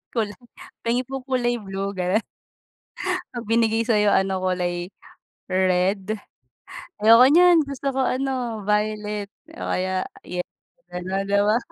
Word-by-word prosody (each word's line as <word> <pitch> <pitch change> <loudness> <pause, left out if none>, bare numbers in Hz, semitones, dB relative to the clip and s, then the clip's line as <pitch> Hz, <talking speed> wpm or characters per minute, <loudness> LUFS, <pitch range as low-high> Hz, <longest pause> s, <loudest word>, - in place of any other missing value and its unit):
Kulay, 215 -1 -2 0.4
pahingi 240 +2 0
po 270 +1 -5
kulay 240 -2 0
blue, 195 0 -4
ganon. 190 +3 0 1.1
'Pag 235 -3 -7
binigay 225 0 +2
sa'yo 210 -3 +3
ano 190 -1 +1
kulay 180 0 -1 0.6
red, 190 +3 +1 0.8
ayoko 230 +3 +8
niyan 345 +3 +6
gusto 275 0 -3
ko 265 -1 0
ano 255 -5 -2
violet 210 0 -1 0.3
o - - -4
kaya 185 0 -1 0.2
yel 180 0 -4 0.4
ganun 190 +2 -3
'di 200 0 +3
ba? 215 +3 +3
210 Hz, 125 wpm, -23 LUFS, 190-240 Hz, 1.1 s, ayoko